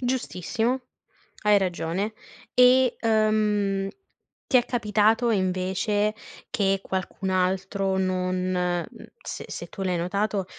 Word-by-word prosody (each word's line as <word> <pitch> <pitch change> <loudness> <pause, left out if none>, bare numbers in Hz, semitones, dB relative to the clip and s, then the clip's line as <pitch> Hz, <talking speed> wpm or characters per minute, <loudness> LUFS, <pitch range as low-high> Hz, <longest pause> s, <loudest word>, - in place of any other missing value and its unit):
Giustissimo. 245 0 -1 0.6
Hai 210 -1 +5
ragione. 185 +2 -1 0.4
E, 250 0 +5
ehm, 210 -3 +1 0.6
ti - - +1
è 245 - +3
capitato 225 0 +2
invece 190 +2 0 0.4
che 195 -2 +1
qualcun 190 +1 -3
altro 190 +1 0
non 185 -1 0 0.2
mhmm, 180 -1 0 0.4
se - - -6
se - - -6
tu 195 - -9
l'hai 180 -2 0
notato, 200 +3 -1
200 Hz, 110 wpm, -25 LUFS, 185-215 Hz, 0.6 s, Hai